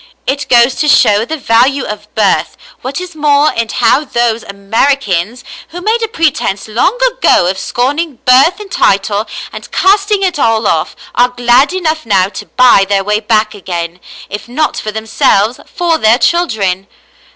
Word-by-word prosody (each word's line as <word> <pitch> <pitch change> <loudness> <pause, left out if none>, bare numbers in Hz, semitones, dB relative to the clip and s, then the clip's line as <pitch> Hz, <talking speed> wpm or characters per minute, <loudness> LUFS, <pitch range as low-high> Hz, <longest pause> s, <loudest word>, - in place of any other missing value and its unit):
It 280 +2 -3
goes 240 +1 +4
to 300 - 0
show 215 -6 +4
the 320 +5 -4
value 260 +2 +2
of 210 0 -8
birth, 205 -3 0 0.2
what 270 +5 -5
is 365 -1 -8
more, 295 0 +2
and 230 -1 -2
how 250 +4 +2
those 235 -4 -1
Americans, 215 +1 -1 0.3
who 345 +2 -8
made^ 445 +5 -1
a - - 0
pretence 305 - -1
David 220 +2 -7
and - - +4
his - - -7
Mother - - +3
^97 - - +1
long - - +6
ago 175 - +2
of 190 - -8
scorning 285 - -2
birth 275 +10 +4
and 410 -3 -10
title 200 +2 +1 0.3
and - - -9
casting 400 +1 +2
it 360 -5 -1
all 225 -3 +1
off, 160 -5 -1 0.2
are 245 +1 +3
glad 245 +4 +2
enough 320 -7 -2
now 190 -3 +2
to - - -9
buy 250 -6 +4
their 200 -1 +1
way 210 +1 0
back 215 0 0
again, 175 -3 -6 0.3
if 205 +3 -7
not 300 +6 -1
for 215 - -4
themselves, 220 +1 0
for 335 -2 -1
their 220 0 +4
children. 210 - 0
245 Hz, 185 wpm, -12 LUFS, 210-305 Hz, 0.3 s, long